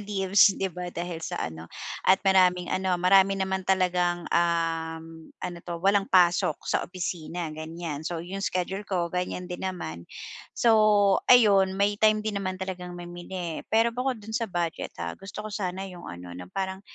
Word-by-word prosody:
leaves 200 -1 +4
'di 190 -1 -2
ba 180 +1 -5
dahil 175 -1 -5
sa 175 +2 -4
ano, 80 +1 -7 0.4
at 190 - +8
maraming 180 -2 +3
ano, 185 -1 +1
marami 195 +2 +4
naman 190 -1 -2
talagang, 180 -2 +1
um, 165 -1 0 0.2
ano 175 - -7
'to, 170 0 -5
walang 195 0 +3
pasok 180 -2 +4
sa - - +1
opisina, 175 -2 -4
ganyan. 155 -1 -6
So, 165 +1 -4
'yong 195 +3 -5
schedule 190 0 -2
ko 175 -3 -1
ganyan 180 0 -2
din 180 0 -6
naman. 85 - -7 0.5
So, 215 -4 +4
ayun 200 -6 +6
may 205 +1 +1
time 215 0 +4
din 210 -2 -2
naman 185 -1 -3
talagang 180 -1 -6
mamili, 175 -1 -6
pero 225 +1 +3
bukod 250 +2 -1
do'n 220 - -8
sa 230 -2 -2
budget 175 -3 -3
ha, 85 0 -4
gusto 200 +2 -8
ko 215 - -6
sana 190 -1 -3
'yong 180 -2 -9
ano 90 0 -9
'no, 90 +1 -9
parang 190 0 -2
180 Hz, 170 wpm, -27 LUFS, 175-195 Hz, 0.5 s, at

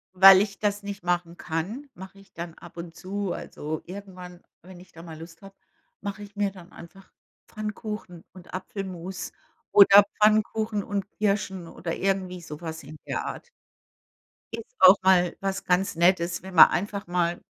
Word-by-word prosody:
Weil 190 0 +9
ich 200 -2 -3
das 205 -1 -1
nicht 200 -2 -7
machen 175 -1 -1
kann, 190 - -4
mache 190 +2 -12
ich 195 - -21
dann 170 0 -7
ab 170 0 -15
und 170 -1 -8
zu 195 0 -4
also 155 +1 -6
irgendwann, 180 -2 -10 0.2
wenn 185 -1 -13
ich 180 - -17
da 165 - -13
mal 160 -2 -10
Lust 165 0 -12
habe 195 0 -14 0.5
mache 205 +1 -5
ich 205 0 -13
mir 205 -1 +1
dann 180 -3 -14
einfach 190 +3 -14 0.4
Pfannkuchen 210 -4 -6
und 185 -2 -15
Apfelmus 185 -1 -6 0.4
oder 200 0 +8 0.2
Pfannkuchen 215 0 +2
und 200 0 -4
Kirschen 195 -4 -1
oder 165 0 -5
irgendwie 190 -2 -2
so 150 -1 -9
was 160 -1 -6
in 150 +3 -11
der - - -3
Art. 480 - -7 1.0
Ist 230 -1 -8
auch 185 +1 +9
mal 180 -2 +4
was 195 0 -2
ganz 180 0 +1
Nettes, 170 0 +2
wenn 190 0 -10
man - - +10
einfach 200 +1 -3
mal 175 -1 -1
190 Hz, 165 wpm, -26 LUFS, 175-200 Hz, 1.0 s, man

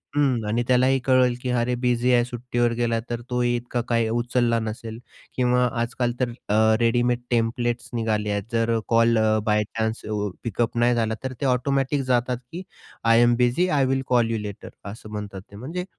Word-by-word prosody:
हं 135 -6 +2
आणि 115 +3 0
त्यालाही 130 +1 +3
कळेल 130 -2 +3
की 125 - -3
अरे, 125 0 0
बिझी 125 0 +2
आहे, 120 -1 +4
सुट्टीवर 120 -1 -1
गेला 115 -1 +1
तर 120 0 -3
तोही 120 -1 +1
इतका 120 0 -3
काही 115 -1 +2
उचलला 120 0 +1
नसेल 110 +1 -6 0.4
किंवा 125 0 +2 0.2
आजकाल 120 +1 -1
तर 125 -2 +1 0.2
अ, 110 +1 +4
रेडीमेड 120 +1 +2
टेम्प्लेट्स 120 +1 -1
निघाले 110 -2 -1
आहेत, 100 -1 -1
जर 115 0 +1
call 115 0 +3
a, 110 0 +3
by 105 0 +2
chance 110 0 -1 0.4
pickup 115 +1 -2
नाही 120 +1 +3
झाला 110 -1 0
तर 130 - -3
ते - - 0
ऑटोमॅटिक 135 +2 +1
जातात 125 0 +1
की 175 +3 -6 0.4
"I 115 +1 +5
am 120 0 +4
busy. 125 +9 +2
I 140 -6 +2
will 135 0 0
call 120 -2 +2
you 115 - 0
later." 105 -1 -7 0.2
असं 110 0 -11
म्हणतात 105 -2 -6
ते. - - -12
म्हणजे 160 - -5
120 Hz, 185 wpm, -24 LUFS, 115-125 Hz, 0.4 s, I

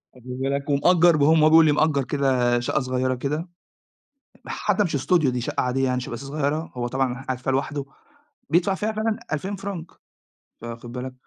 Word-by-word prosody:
واخد 125 0 -16
بالك، 140 +2 -2
ومأجر 170 +3 +4
بقى 145 0 +3
م 155 - +4
هو 155 - +6
بيقول 160 0 +7
لي 150 - +4
مأجر 150 -2 +2
كده 130 -4 +1
شقة 120 - 0
صغيرة 130 0 -1
كده، 150 +7 -3 1.0
حتى 205 - 0
مش 160 - -1
studio 170 -6 +3
دي 125 -1 -1
شقة 145 +5 -2
عادية 130 +1 0
يعني، 125 -1 0
شقة 125 - -7
بس 120 - -5
صغيرة، 150 +3 -2
هو 120 -1 -3
طبعًا 130 0 -2
قاعد 130 -2 -3
فيها 135 +1 -2
لوحده 140 +1 -1 0.7
بيدفع 180 +4 +3
فيها 215 +3 -2
فعلًا 215 0 -1
2000 190 +7 -2
فرانك، 195 -4 -6 0.8
فواخد 120 +1 -8
بالك. 125 +1 -6
140 Hz, 185 wpm, -24 LUFS, 130-160 Hz, 1.0 s, بيقول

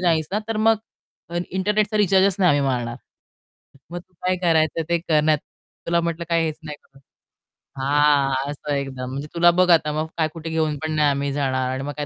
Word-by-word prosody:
नाहीस 165 -4 +1
ना, 210 - +1
तर 225 - -2
मग 225 +1 +4 0.7
इंटरनेटचा 210 +3 0
रिचार्जच 195 -2 +3
नाही 185 -2 +4
आम्ही 145 -2 +3
मारणार. 120 -2 -2 0.9
मग 175 - -5
तू 180 +1 -18
काय 185 0 +1
करायचं 165 -1 +2
ते 170 0 +2
कर, 160 -2 +1
नाहीतर 155 -1 +1 0.4
तुला 170 0 +2
म्हटलं 170 0 -3
काय 165 -1 +2
हेच 155 -1 -3
नाही 150 -2 -7
कळत." 135 0 -23 0.8
हां, 140 -1 +2
असं 145 0 -5
एकदम 130 -2 -4
म्हणजे 140 +3 -5
"तुला 175 0 +5
बघ 180 - +3
आता 160 -3 +4
मग 160 - -3
काय 160 -2 +2
कुठे 165 -1 -7
घेऊन 160 -2 -1
पण 155 - -2
नाही 150 -1 +3
आम्ही 140 0 -1
जाणार 130 -2 -1
आणि 130 +1 -4
मग 145 - -5
काय 150 - -3
155 Hz, 200 wpm, -22 LUFS, 140-175 Hz, 0.9 s, तुला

